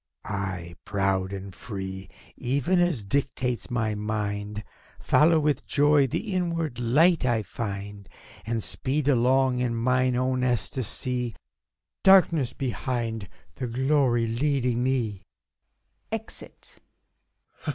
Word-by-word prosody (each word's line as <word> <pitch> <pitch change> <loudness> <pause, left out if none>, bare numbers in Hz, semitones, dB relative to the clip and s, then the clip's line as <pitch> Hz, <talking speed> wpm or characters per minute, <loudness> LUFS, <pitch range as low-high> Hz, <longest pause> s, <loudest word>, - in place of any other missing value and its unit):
I, 95 -4 -4
proud 95 -1 0
and 95 -1 -6
free, 95 -1 -6 0.3
even 140 +8 +1
as 175 -11 +1
dictates 125 +2 -1
my 110 -3 0
mind. 105 0 -3 0.4
Follow 160 +1 +4
with 150 -3 0
joy 145 -1 +4
the 200 - -3
inward 165 -8 -1
light 150 +8 +4
I 120 -4 +1
find, 100 -2 -6 0.3
And 115 -1 -2
speed 140 +1 -2
along, 130 0 +3
in 120 -2 0
mine 125 +2 +2
own 130 0 0
ecstasy. 125 0 -1 0.7
Darkness 170 -9 +5
behind, 120 -5 -3 0.2
the 125 - -4
Glory 130 -1 +2
leading 125 0 0
me! 120 -7 0 0.9
[Exit. 225 0 -5
125 Hz, 105 wpm, -26 LUFS, 105-140 Hz, 0.9 s, Darkness